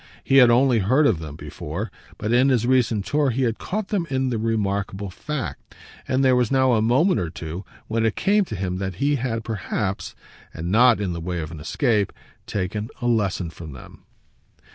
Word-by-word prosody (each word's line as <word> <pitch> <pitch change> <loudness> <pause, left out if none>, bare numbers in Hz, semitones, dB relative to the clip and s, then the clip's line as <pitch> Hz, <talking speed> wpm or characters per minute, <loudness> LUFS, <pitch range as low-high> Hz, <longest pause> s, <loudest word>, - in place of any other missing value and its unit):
He 135 - +3
had 125 -3 +8
only 125 0 +4
heard 130 +10 +3
of 105 - +3
them 75 -2 -7
before, 85 +8 -6 0.3
but 105 +3 -1
in 130 +3 +5
his 120 -3 +2
recent 120 -5 +2
tour 145 -1 +1
he 130 +2 0
had 115 -2 0
caught 210 +1 -3
them 190 -6 -1
in 130 -1 0
the 115 - -1
remarkable 100 -3 -1
fact, 150 +7 -6 0.3
and 130 +1 +2
there 130 -1 +5
was 125 -2 +2
now 130 -2 +3
a 110 - +3
moment 130 - +3
or 85 -3 -2
two 80 +3 -6 0.2
when 115 +1 -1
it 110 -2 +1
came 205 +1 +3
to 110 - -6
him 90 -1 -2
that 95 -1 -3
he 145 +8 +1
had 115 -3 -2
perhaps 100 -2 -3 0.4
and 85 +2 -4
not 120 +2 +5
in 95 -4 -1
the 85 - -5
way 90 +1 -3
of 80 0 -5
an 80 - -8
escape 105 - +1 0.4
taken 105 +3 -3
a - - -4
lesson 100 -7 0
from 80 -3 -9
them. 65 - -13
115 Hz, 205 wpm, -23 LUFS, 95-130 Hz, 0.4 s, had